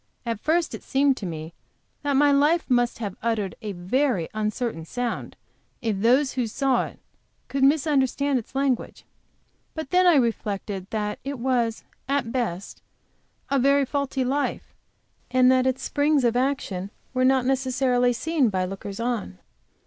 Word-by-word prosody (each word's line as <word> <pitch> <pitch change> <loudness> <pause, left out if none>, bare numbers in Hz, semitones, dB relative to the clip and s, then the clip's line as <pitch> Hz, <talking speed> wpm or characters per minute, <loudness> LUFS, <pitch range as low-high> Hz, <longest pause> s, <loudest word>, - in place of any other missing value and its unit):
At 230 -3 -2
first 320 +6 +1
it - - -6
seemed 275 0 +2
to 195 - -5
me 160 0 -6 0.5
that 290 -1 0
my 290 +1 +5
life 295 +4 +3
must 245 -1 +2
have 205 -4 -4
uttered 215 -5 -1
a 210 -2 -4
very 185 - 0
uncertain 215 -3 -2
sound 245 +8 -4 0.4
if 220 -4 -1
those 260 +6 +3
who 250 -3 -1
saw 265 +2 +1
it - - -13 0.5
could 275 -1 0
misunderstand 280 -2 +2
its 235 - -13
language. 270 -3 -1 0.7
But 315 -4 -5
then 365 0 +5
I 345 - +6
reflected 205 -6 -1
that 210 -1 -2
it 275 +1 -4
was, 240 -2 0 0.3
at 275 -5 0
best, 215 -8 -3 0.7
a 275 - +3
very 280 +2 +4
faulty 275 -1 -1
life, 280 +3 -2 0.6
and 255 0 +5
that 260 0 +3
its 260 0 -1
springs 290 -1 +2
of 240 -1 +2
action 245 -8 -1 0.2
were 255 0 +1
not 260 -1 +3
necessarily 255 -1 +2
seen 280 +1 +1
by 185 -2 0
lookers 195 +2 -7
on. 230 - -2
255 Hz, 155 wpm, -25 LUFS, 215-275 Hz, 0.7 s, I